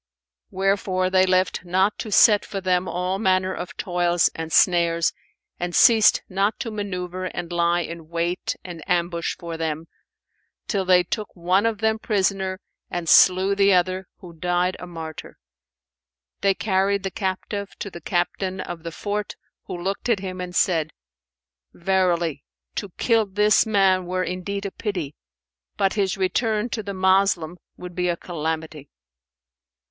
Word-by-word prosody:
Wherefore 190 -1 0
they 185 0 +4
left 185 0 +1
not 190 +3 +1
to 215 - -5
set 205 0 +6
for 200 - -5
them 185 -1 +1
all 180 +2 -2
manner 185 -2 +2
of 180 - -7
toils 175 -1 +1
and 160 0 -6
snares 170 -1 +3 0.5
and 175 -1 -3
ceased 225 -2 +6
not 195 +3 0
to 230 - -4
manoeuvre 185 -3 -4
and 175 -1 -5
lie 170 0 +2
in 165 -2 -7
wait 170 +1 -2
and 170 -3 -8
ambush 170 -1 0
for 170 -1 -6
them, 160 0 -3 0.8
till 195 -3 -1
they 180 -1 +5
took 210 +4 -5
one 185 +5 +2
of 225 -2 -1
them 220 0 +1
prisoner 190 -3 0 0.3
and 175 -1 -4
slew 185 +4 +6
the 200 0 +4
other, 185 +1 +1
who 175 -2 -11
died 180 +2 0
a 180 - -8
martyr. 160 -2 -8 1.0
They 195 -1 +2
carried 200 -1 +1
the 195 - -3
captive 200 0 -3
to 200 - -6
the 170 - -9
Captain 185 +1 -1
of 175 -2 -6
the 165 0 -6
fort, 205 +4 -4 0.3
who - - -5
looked 195 +6 -3
at 230 - +3
him 185 -1 -5
and 180 -1 -6
said, 165 -3 +1 0.8
"Verily, 175 -5 0 0.3
to 205 - -4
kill 225 -3 +2
this 210 +2 +3
man 190 -4 +3
were 185 +1 -1
indeed 190 +3 -4
a 200 - -3
pity; 180 -11 -4 0.6
but 195 - +2
his 195 -1 0
return 215 +4 0
to 225 - -3
the 200 -1 -6
Moslem 190 -3 +2 0.2
would 180 0 -8
be 180 0 0
a 170 - 0
calamity." 160 -3 -5
185 Hz, 155 wpm, -23 LUFS, 175-195 Hz, 1.0 s, set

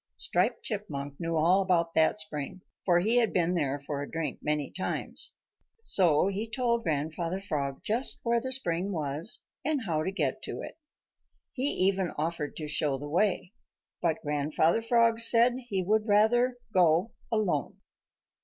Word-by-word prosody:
Striped - - 0
Chipmunk 145 - -5
knew 165 -1 -2
all 175 +5 +4
about 170 -3 +1
that 160 0 +3
spring, 155 +2 -4 0.2
for 175 -2 +4
he 220 +7 +3
had 230 -4 +3
been 175 -1 +1
there 145 -5 0
for 140 0 -5
a 145 - -6
drink 165 -1 -3
many 150 -2 -1
times. 185 - -2 0.5
So 175 - +4
he 200 +3 -2
told 235 0 0
Grandfather 160 +2 -2
Frog 145 -8 -3
just 235 +5 0
where 235 0 +1
the 260 - -4
spring 190 -7 0
was 155 +4 0 0.2
and 295 -3 -1
how 160 -4 0
to 185 - -2
get 195 - -1
to - - -5
it. - - -9 0.7
He 265 +1 0
even 190 -1 +1
offered 155 -1 -3
to 155 - -5
show 150 -2 0
the 145 +2 -7
way, 180 +3 0 0.5
but 165 -2 0
Grandfather 150 +6 +1
Frog 230 0 +3
said 230 +1 +5
that 255 0 -8
he 190 -2 0
would 215 +4 +1
rather 240 +4 +3 0.2
go 180 +3 +3 0.2
alone. 195 -10 -1
180 Hz, 165 wpm, -29 LUFS, 155-220 Hz, 0.7 s, said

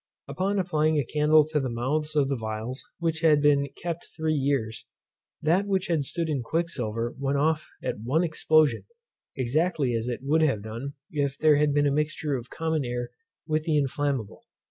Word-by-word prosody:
Upon 195 +2 -1
applying 155 -4 +1
a 145 - +1
candle 150 +2 +4
to 155 -1 +1
the 135 -2 -2
mouths 150 +6 -2
of 145 -2 +3
the 135 - 0
phials 110 +2 -5
which 165 -1 -1
had 155 -3 +5
been 145 -1 +3
kept 170 -1 -4
three 160 -1 0
years, 135 -6 -1 0.6
that 180 +6 +2
which 190 -2 0
had 155 -5 +1
stood 165 +4 -2
in 145 -5 -1
quicksilver 120 -6 -2
went 140 0 0
off 155 +2 +1
at - - -3
one 135 +10 +1
explosion, 155 -2 +2 0.5
exactly 140 +1 +1
as 115 +1 -1
it 125 0 -3
would 155 +4 +2
have 135 -10 +1
done 115 +6 -6 0.2
if 140 -3 -1
there 155 -2 +5
had 150 0 +3
been 145 0 +2
a 140 - +3
mixture 150 0 -1
of 125 -1 -6
common 160 -2 -1
air 120 0 -3 0.3
with 155 0 -1
the 155 -2 +2
inflammable. 140 -5 -1
145 Hz, 185 wpm, -26 LUFS, 130-155 Hz, 0.6 s, had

